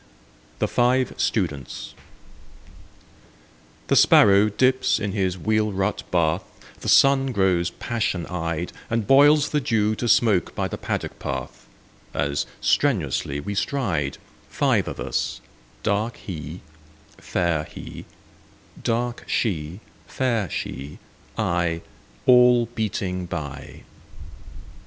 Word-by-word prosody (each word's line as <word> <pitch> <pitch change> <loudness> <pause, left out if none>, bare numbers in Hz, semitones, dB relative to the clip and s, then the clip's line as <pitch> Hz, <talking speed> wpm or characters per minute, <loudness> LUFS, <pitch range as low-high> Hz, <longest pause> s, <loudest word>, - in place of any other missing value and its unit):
THE - - 0
FIVE 125 +1 +2
STUDENTS 70 -3 -2 1.9
THE - - +1
sparrow 100 +1 +6
dips 130 +5 +2
in 105 -1 -2
his 95 -2 -1
wheel 110 +2 +1
rut 95 +1 -1
bath, 80 -3 +1 0.4
The - - -4
sun 135 -1 +5
grows 95 -5 +2
passionate 95 -5 -3
eyed, 85 -1 -3 0.2
And 115 -2 0
boils 145 +3 +5
the 150 - 0
dew 110 -4 +1
to 120 - -2
smoke 105 -7 +3
by - - -1
the - - -6
paddock - - -4
path; - - -6 0.5
As 70 0 -1
strenuously 80 - +1
we 100 +8 -4
stride,— 95 - -1 0.3
Five - - +1
of - - -6
us; 60 0 -2 0.4
dark 105 +3 0
He, 80 -2 -7 0.6
fair 85 -4 -1
He, - - -10 0.8
dark 120 +1 -1
She, 90 -3 -2 0.3
fair 115 -8 -1
She, 70 +2 -5 0.4
I, 85 -1 0 0.4
All 125 -1 +6
beating 95 -5 -2
by. 75 -5 -7
100 Hz, 110 wpm, -23 LUFS, 85-120 Hz, 1.9 s, sparrow